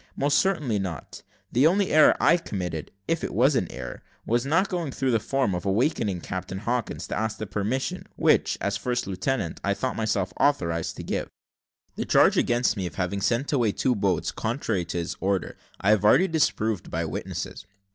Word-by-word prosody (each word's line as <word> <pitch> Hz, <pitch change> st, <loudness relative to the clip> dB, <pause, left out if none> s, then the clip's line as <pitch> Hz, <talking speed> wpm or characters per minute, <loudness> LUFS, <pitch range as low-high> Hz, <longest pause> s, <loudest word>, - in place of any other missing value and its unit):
Most 145 Hz, +1 st, +2 dB
certainly 150 Hz, -, +1 dB
not. 90 Hz, -8 st, -6 dB, 0.3 s
The 130 Hz, +6 st, +5 dB
only 195 Hz, +3 st, +2 dB
error 155 Hz, 0 st, +6 dB
I 170 Hz, -, +5 dB
committed, 90 Hz, -, -4 dB, 0.2 s
if 165 Hz, -1 st, 0 dB
it -, -, -3 dB
were 130 Hz, +6 st, +5 dB
an 90 Hz, -9 st, 0 dB
error, 60 Hz, -1 st, -7 dB, 0.2 s
was 120 Hz, +3 st, 0 dB
not 165 Hz, +7 st, +3 dB
going 175 Hz, -7 st, -3 dB
through 130 Hz, 0 st, 0 dB
the 115 Hz, -, +3 dB
form, 130 Hz, -2 st, 0 dB
of 90 Hz, -, -3 dB
awaking 100 Hz, -, 0 dB
Captain 95 Hz, 0 st, -5 dB
Hawkins, 120 Hz, +3 st, -2 dB
to -, -, -2 dB
ask 110 Hz, 0 st, -2 dB
the 110 Hz, -, -4 dB
permission, 105 Hz, +6 st, -2 dB
which, -, -, +3 dB
as -, -, -1 dB
first 125 Hz, -1 st, -2 dB
lieutenant, 95 Hz, 0 st, -2 dB
I 100 Hz, 0 st, +1 dB
thought 130 Hz, +6 st, -2 dB
myself 105 Hz, -4 st, -1 dB
authorised 85 Hz, -, +1 dB
to -, -, -6 dB
give. -, -, -3 dB, 0.7 s
"The -, -, -2 dB
charge -, -, +5 dB
against 120 Hz, -2 st, +2 dB
me, 95 Hz, -4 st, -2 dB
of 75 Hz, -, -9 dB
having 95 Hz, +2 st, -2 dB
sent 120 Hz, +8 st, 0 dB
away 120 Hz, -7 st, +2 dB
two 130 Hz, -, +1 dB
boats, 100 Hz, -5 st, 0 dB
contrary 110 Hz, -6 st, -2 dB
to 85 Hz, -, -4 dB
his 85 Hz, -1 st, -3 dB
order, 95 Hz, 0 st, -1 dB, 0.2 s
I 100 Hz, -, +3 dB
have 105 Hz, -2 st, +3 dB
already 135 Hz, -, +5 dB
disproved 110 Hz, -, 0 dB
by 85 Hz, +1 st, -2 dB
witnesses. 80 Hz, +3 st, -5 dB
110 Hz, 190 wpm, -26 LUFS, 95-135 Hz, 0.7 s, error